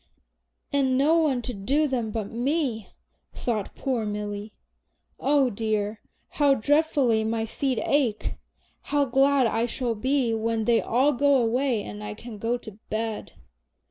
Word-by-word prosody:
"And 265 -2 +2
no 295 +5 +4
one 280 -7 +1
to 250 - -3
do 275 +10 +1
them 245 -5 -1
but 215 -2 -4
me," 245 - -1 0.5
thought 220 -5 -2
poor 255 -5 -1
Milly. 210 0 -4 0.7
"Oh 275 -2 +3
dear, 215 0 -2 0.3
how 285 -2 +3
dreadfully 280 -3 +2
my 225 0 -1
feet 260 +2 -2
ache! 255 -7 +1 0.6
How 290 -1 +2
glad 270 +1 +3
I 230 +1 +1
shall 240 -1 -1
be 255 +2 0
when 225 0 -1
they 235 0 +3
all 265 +5 +2
go 280 +2 +4
away 245 -1 +1
and 105 0 -8
I 105 0 -5
can 230 -3 -9
go 230 +3 0
to 215 -3 -12
bed!" 220 0 -3
240 Hz, 145 wpm, -26 LUFS, 220-275 Hz, 0.7 s, no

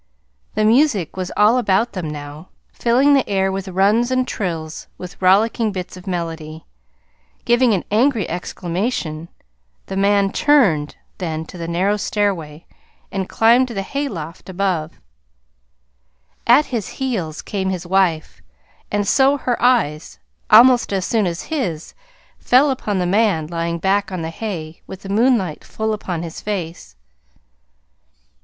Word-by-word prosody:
The 215 0 +2
music 225 - +2
was 185 -1 -4
all 220 +4 +5
about 220 +1 +1
them 180 -5 -4
now, 150 +3 -8 0.2
filling 255 +5 +3
the 275 -5 +2
air 190 -1 +1
with 195 0 -4
runs 200 +6 +2
and 255 0 0
trills 165 -8 -4
and 180 -1 -9
rollicking 215 +4 +3
bits 185 -2 -6
of 185 +1 -13
melody. 165 -3 -5 0.8
Giving 240 -2 +3
an 185 - -2
angry 230 -1 +2
exclamation, 175 -1 -3 0.6
the 190 - -6
man 200 0 +2
turned 200 - +2 0.2
then 160 -3 -3
to 180 - -11
the 165 - -4
narrow 185 +5 +1
stairway 175 -8 -2 0.5
and 190 -1 -3
climbed 235 +3 +4
to 235 - -8
the 195 - -2
hayloft 190 - -5
above. 180 -4 -1 1.5
At 245 +6 +6
his 230 -6 -3
heels 195 - -3
came 190 -3 -2
his 185 -2 -4
wife, 175 -4 0 0.5
and 205 -1 0
so 275 +4 +4
her 250 -3 -2
eyes, 225 -12 +1 0.3
almost 245 +2 +6
as 190 -2 -1
soon 220 -4 +1
as 170 0 -4
his 205 - -4 0.5
fell 270 +3 +4
upon 210 -6 -2
the 180 - 0
man 195 -4 +2
lying 170 +1 -3
back 195 +3 0
on 180 -3 -4
the 160 - -4
hay 165 -5 -6
with 190 - -10
the 195 - -8
moonlight 210 - +1
full 220 0 -3
upon 180 -5 -4
his 165 -1 -7
face. 170 - -5
195 Hz, 145 wpm, -19 LUFS, 170-230 Hz, 1.5 s, At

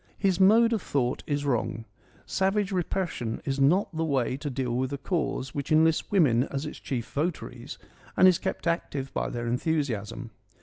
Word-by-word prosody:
His 190 -3 +1
mode 225 +5 +6
of 220 - 0
thought 130 -7 -1
is 145 -1 -1
wrong. 115 -4 -1 0.4
Savage 195 +1 0
repression 175 -10 -2
is 135 0 -1
not 165 +6 +3
the 160 - 0
way 135 -5 0
to 145 +2 -4
deal 125 -2 -2
with 130 +1 -1
a 140 - -2
cause 140 -4 -2
which 140 +1 -4
enlists 160 +1 +3
women 145 - +4
as 140 +1 -4
its 150 - -7
chief 120 -4 -4
votaries 145 -4 -3 0.4
and 185 - +7
is 180 -2 +4
kept - - -4
active 145 -5 -2
by - - -1
their 120 -1 -4
enthusiasm. 125 -4 -2
145 Hz, 175 wpm, -27 LUFS, 130-175 Hz, 0.4 s, and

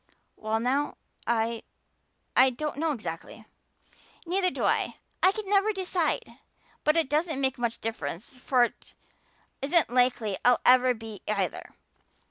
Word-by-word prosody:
"Well 220 +1 -2
now, 265 +5 0 0.3
I 230 -1 0 0.7
I 260 +1 +7
don't 295 +3 -4
know 320 +1 0
exactly." 210 - -7 0.8
"Neither 365 +2 +1
do - - -5
I. - - +1 0.3
I 370 - +6
can 425 0 -6
never 400 +2 +3
decide. 355 - -2 0.4
But 305 +1 +3
it 325 - +2
doesn't 305 +1 0
make 265 -2 0
much 235 -1 -1
real - - -25
difference 190 - -7
for 250 -1 +3
it 240 - -4 0.7
isn't 295 +1 +2
likely 245 -5 +2
I'll 245 0 +5
ever 255 0 +6
be 220 -2 -9
either. 215 - -2
255 Hz, 140 wpm, -27 LUFS, 230-320 Hz, 0.8 s, I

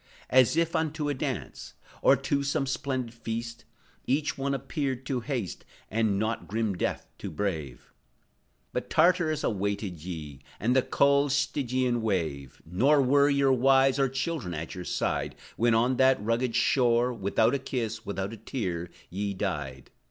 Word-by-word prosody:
As 130 +3 +5
if 170 0 +1
unto 155 -2 -1
a - - +1
dance, 130 -4 -5 0.3
Or 135 - +6
to 140 +2 -1
some 140 0 0
splendid 130 -3 -2
feast, 115 0 -5 0.4
Each 145 +3 +1
one 140 0 -1
appeared 135 -2 -3
to 130 -1 -1
haste, 120 - -4 0.3
And 110 -2 +1
not 110 +2 -2
grim 110 -1 -1
death - - -1
Death - - -29
to - - -5
brave; 80 -11 -4 0.8
But - - -3
Tartarus 160 -2 +3
awaited 100 -4 -2
ye, 75 -6 -7 0.2
And 120 +4 +1
the 130 - +6
cold 140 +2 +3
Stygian 130 -3 0
wave; 80 - -2
Nor 125 - +3
were 140 +2 +4
your 140 -1 +3
wives 135 +1 +4
or 135 -1 +3
children 135 - -3
at 80 +2 -5
your 90 -1 -7
side, - - -1 0.2
When, 115 0 +3
on 120 +3 +2
that 130 0 +5
rugged 115 +3 0
shore, 125 -1 +3
Without 110 +2 +1
a 140 - +1
kiss, 115 -4 -3
without 100 -1 -4
a - - -8
tear, 90 -9 -4 0.2
ye 100 +2 -2
died. 75 -9 -4
120 Hz, 160 wpm, -28 LUFS, 100-135 Hz, 0.8 s, Or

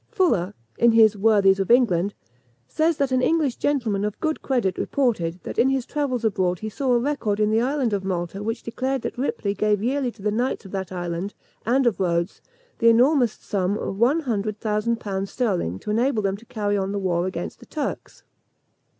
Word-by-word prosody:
Fuller, 325 - +1 0.2
in 235 -1 +5
his 220 -2 +6
Worthies 200 -2 +4
of 195 - -1
England, 205 -6 +3 0.5
says 320 0 +1
that 275 -2 0
an 255 0 +2
English 300 -3 +1
gentleman 235 -9 0
of 210 -1 -3
good 315 -1 -1
credit 235 -9 0
reported, 185 -11 0
that - - -5
in 265 - +5
his 265 -2 0
travels 255 -6 -2
abroad 185 -4 +1
he 215 +5 -5
saw 260 +4 -1
a - - +5
record 235 -6 -1
in 210 0 +2
the 220 +1 +3
island 260 -3 0
of 200 -1 -1
Malta 185 0 -3
which 225 +2 -3
declared 260 +2 -2
that - - -4
Ripley 240 -5 -2
gave 210 0 +1
yearly 260 +1 0
to 205 - -15
the 210 - +1
knights 240 0 -1
of 190 - -10
that 190 -2 -4
island, 175 +2 -4 0.3
and 260 +3 +3
of 235 -4 +1
Rhodes, 170 0 -1 0.4
the 230 - +5
enormous 245 0 +4
sum 195 0 -2
of 195 - -4
one 270 +8 +3
hundred 215 -6 -2
thousand 220 +2 0
pounds 195 -2 -3
sterling 185 - -1
to 210 - -5
enable 230 0 +1
them 195 -1 0
to 225 +2 -18
carry 210 -4 -1
on 195 0 -2
the - - -2
war 180 -2 0
against 90 - -5
the - - -15
Turks. - - -5
215 Hz, 200 wpm, -23 LUFS, 195-255 Hz, 0.5 s, his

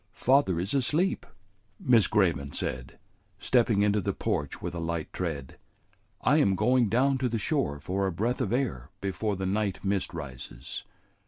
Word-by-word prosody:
"Father 130 -10 +3
is 95 +3 -2
asleep," 150 +8 +1 0.5
Miss 115 -5 +4
Grayman 85 -9 +1
said, 65 0 -4 0.4
stepping 115 -5 +2
into 105 0 +2
the - - -1
porch 70 -1 -2
with - - -5
a 85 - -4
light 85 -1 -3
tread. 75 -7 -4 0.6
"I - - +4
am 95 -1 +3
going 120 +2 +3
down 130 +4 +2
to 130 -1 0
the 115 - -1
shore 115 - -1
for 95 +6 -1
a - - -1
breath 115 +9 -1
of - - -1
air 115 - -1
before 100 +2 -2
the 95 0 -3
night 100 0 -1
mist 95 -1 0
rises. 65 -5 -7
100 Hz, 165 wpm, -28 LUFS, 85-120 Hz, 0.6 s, Miss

